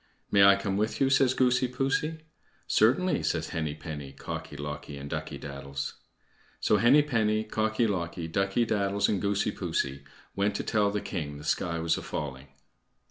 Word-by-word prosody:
"May 100 Hz, -, +6 dB
I 100 Hz, 0 st, +8 dB
come 100 Hz, 0 st, -2 dB
with 110 Hz, +2 st, -1 dB
you?" 135 Hz, -1 st, +3 dB
says 130 Hz, -1 st, +4 dB
Goosey 125 Hz, 0 st, +3 dB
poosey. 135 Hz, +5 st, -1 dB, 0.4 s
"Certainly," 140 Hz, +12 st, +3 dB
says -, -, -1 dB
Henny 80 Hz, -2 st, -2 dB
penny, 75 Hz, -3 st, -7 dB
Cocky 70 Hz, +1 st, -6 dB
locky, 75 Hz, 0 st, -6 dB
and 70 Hz, 0 st, -7 dB
Ducky -, -, -4 dB
daddles. 70 Hz, -1 st, -5 dB, 0.7 s
So 105 Hz, -, +3 dB
Henny 125 Hz, +8 st, +6 dB
penny, 110 Hz, -6 st, +1 dB
Cocky 110 Hz, +1 st, 0 dB
locky, 85 Hz, -4 st, -2 dB
Ducky 100 Hz, +7 st, +1 dB
daddles, 100 Hz, -2 st, +1 dB
and 100 Hz, -3 st, 0 dB
Goosey 100 Hz, +1 st, +1 dB
poosey 70 Hz, -8 st, -2 dB, 0.3 s
went 100 Hz, +1 st, +1 dB
to -, -, -2 dB
tell 105 Hz, -2 st, +2 dB
the 105 Hz, 0 st, -2 dB
king 75 Hz, -6 st, -4 dB
the 75 Hz, -, -10 dB
sky 85 Hz, +1 st, 0 dB
was 80 Hz, 0 st, 0 dB
a -, -, -7 dB
falling. 70 Hz, -2 st, -5 dB
100 Hz, 170 wpm, -28 LUFS, 75-110 Hz, 0.7 s, I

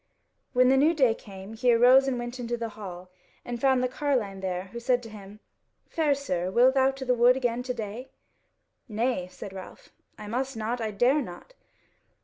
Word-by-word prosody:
When 250 Hz, 0 st, +4 dB
the 265 Hz, -, +4 dB
new 310 Hz, +5 st, +4 dB
day 260 Hz, -7 st, +4 dB
came 195 Hz, -1 st, -11 dB
he 245 Hz, +2 st, +2 dB
arose 250 Hz, +3 st, +6 dB
and 260 Hz, -2 st, 0 dB
went 240 Hz, +1 st, -6 dB
into 240 Hz, 0 st, -3 dB
the 230 Hz, -1 st, -4 dB
hall, 185 Hz, -4 st, -9 dB, 0.3 s
and 240 Hz, -1 st, -5 dB
found 265 Hz, -2 st, +3 dB
the -, -, +2 dB
carline 250 Hz, -8 st, -2 dB
there, 185 Hz, -1 st, -3 dB
who 235 Hz, -, -5 dB
said 245 Hz, 0 st, +1 dB
to 225 Hz, -, -10 dB
him, 205 Hz, 0 st, -12 dB, 0.5 s
"Fair 305 Hz, -3 st, +1 dB
sir, 185 Hz, -11 st, -2 dB
will 245 Hz, +6 st, +5 dB
thou 265 Hz, 0 st, +3 dB
to 270 Hz, 0 st, -6 dB
the 250 Hz, -, +2 dB
wood 245 Hz, +1 st, +4 dB
again 245 Hz, -2 st, -1 dB
to 250 Hz, 0 st, -3 dB
day?" 225 Hz, +4 st, -6 dB, 0.8 s
"Nay," 220 Hz, -3 st, -1 dB
said 190 Hz, +1 st, -10 dB
Ralph, 190 Hz, -1 st, -11 dB, 0.3 s
"I 210 Hz, -, -9 dB
must 250 Hz, +4 st, -3 dB
not, 230 Hz, +2 st, -3 dB
I 220 Hz, -, -1 dB
dare 245 Hz, +8 st, +2 dB
not." 230 Hz, -, -10 dB
240 Hz, 195 wpm, -27 LUFS, 210-260 Hz, 0.8 s, arose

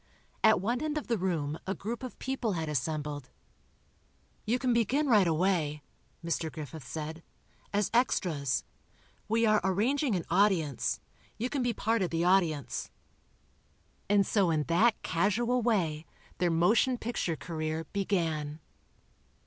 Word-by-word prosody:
At 220 Hz, -, +6 dB
one 235 Hz, +7 st, -1 dB
end 305 Hz, 0 st, -1 dB
of 300 Hz, -, -3 dB
the 235 Hz, -, 0 dB
room 160 Hz, -5 st, -1 dB
a 195 Hz, -, -1 dB
group 230 Hz, +4 st, -5 dB
of 255 Hz, -2 st, -7 dB
people 255 Hz, -5 st, -2 dB
had 160 Hz, -2 st, -2 dB
assembled. 150 Hz, -1 st, -3 dB, 1.2 s
"You 235 Hz, +3 st, +2 dB
can 255 Hz, -1 st, +1 dB
begin 250 Hz, +6 st, +2 dB
right 215 Hz, -9 st, +5 dB
away," 160 Hz, -3 st, +1 dB, 0.4 s
Mr. 165 Hz, -1 st, -1 dB
Griffith 155 Hz, -1 st, -8 dB
said, 160 Hz, +1 st, -5 dB, 0.5 s
"as 205 Hz, -1 st, 0 dB
extras. 160 Hz, -, +1 dB, 0.6 s
We 225 Hz, +1 st, +2 dB
are 215 Hz, -1 st, +4 dB
arranging 230 Hz, +7 st, +1 dB
an 175 Hz, -, -2 dB
'audience.' 175 Hz, -, +2 dB, 0.4 s
You 245 Hz, +4 st, -2 dB
can 280 Hz, -, 0 dB
be 245 Hz, -1 st, +1 dB
part 225 Hz, 0 st, 0 dB
of 180 Hz, -, +1 dB
the 165 Hz, +1 st, 0 dB
audience." 170 Hz, -6 st, +1 dB, 1.2 s
And 200 Hz, -1 st, +4 dB
so 195 Hz, -3 st, +2 dB
in 155 Hz, -2 st, +1 dB
that 210 Hz, +9 st, +3 dB
casual 225 Hz, +8 st, +1 dB
way, 170 Hz, -9 st, 0 dB, 0.3 s
their 175 Hz, 0 st, +2 dB
motion 215 Hz, +10 st, +3 dB
picture 225 Hz, -8 st, -2 dB
career 160 Hz, 0 st, -3 dB
began. 165 Hz, -7 st, -1 dB
185 Hz, 140 wpm, -30 LUFS, 160-230 Hz, 1.2 s, At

